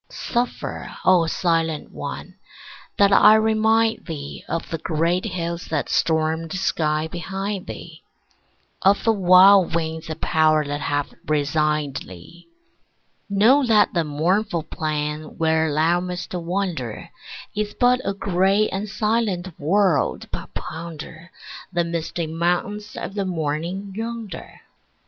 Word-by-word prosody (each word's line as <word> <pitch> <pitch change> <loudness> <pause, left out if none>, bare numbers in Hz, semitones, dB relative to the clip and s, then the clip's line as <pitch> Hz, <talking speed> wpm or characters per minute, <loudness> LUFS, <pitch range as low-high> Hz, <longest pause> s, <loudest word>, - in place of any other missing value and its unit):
Suffer, 245 0 -3
O 180 -3 +5
silent 165 -3 0
one, - - -7 0.6
that 200 0 +5
I 210 +2 +8
remind 220 +1 +2
thee 145 -4 -6
Of 165 - -3
the 165 - -2
great 170 +4 0
hills 170 -3 -3
that 155 -3 -2
stormed 160 -2 +1
the 185 - -4
sky 155 -4 0
behind 195 +3 -4
thee, - - -9 0.8
Of 195 +1 +3
the 225 - +4
wild 185 -2 +6
winds 160 -1 -3
of 160 0 -5
power 155 -2 +3
that 145 +1 -3
have 145 -1 -2
resigned 150 -1 0
thee. 95 - -11 0.8
Know 225 +8 +5
that 215 -2 +4
the 170 - +1
mournful 170 +4 0
plain 150 0 -4
where 160 -1 +2
thou 160 +4 +2
must 180 0 -5
wander 175 - -3 0.4
Is 210 0 -2
but 250 +1 +4
a 195 - -2
gray 195 +2 +2
and 200 +2 -4
silent 210 -4 0
world, 160 - +1
but - - -6
ponder 165 +1 -8 0.4
The 175 -2 +1
misty 170 0 -3
mountains 180 +6 -2
of - - -5
the 200 -1 -2
morning 175 +3 -3
yonder. 225 -5 -6
175 Hz, 125 wpm, -22 LUFS, 160-200 Hz, 0.8 s, I